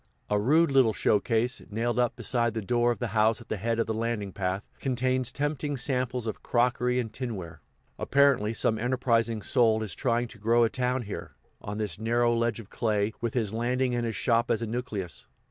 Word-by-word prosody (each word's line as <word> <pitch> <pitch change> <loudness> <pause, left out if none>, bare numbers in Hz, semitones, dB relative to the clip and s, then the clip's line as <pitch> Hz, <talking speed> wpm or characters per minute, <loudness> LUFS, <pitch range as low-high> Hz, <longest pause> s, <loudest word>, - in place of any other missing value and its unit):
A 105 - +3
rude 150 +8 +3
little 130 -5 +4
show 105 - +2
case, 115 +5 0
nailed 115 +3 -1
up 120 -1 +1
beside 120 -2 0
the 110 - -1
door 120 +3 +2
of 120 - -2
the 120 - -3
house 110 0 +3
at 120 - -14
the 110 - -2
head 115 +3 -1
of 115 - +1
the 110 - -2
landing 110 -3 -2
path, 95 +1 -2
contains 130 -1 0
tempting 145 0 -2
samples 125 -2 -1
of 110 - -4
crockery 125 +1 +1
and 110 -3 -4
tinware. 105 -10 -6 0.4
Apparently 140 -6 +3
some 110 0 0
enterprising 115 -3 +1
soul 110 -4 +3
is 100 -5 -5
trying 120 -2 0
to 110 - -14
grow 115 +3 +3
a 115 - +2
town 125 0 -1
here, 105 - -7 0.3
on 105 0 -5
this 105 -4 -3
narrow 120 +1 +2
ledge 115 -1 0
of 110 -3 -12
clay, 105 -2 0
with 115 0 -2
his 110 -4 0
landing 125 +2 0
and 120 -1 0
his 110 - -3
shop 115 +3 +1
as 115 0 +1
a - - 0
nucleus. 110 -6 -4
115 Hz, 205 wpm, -28 LUFS, 110-125 Hz, 0.4 s, little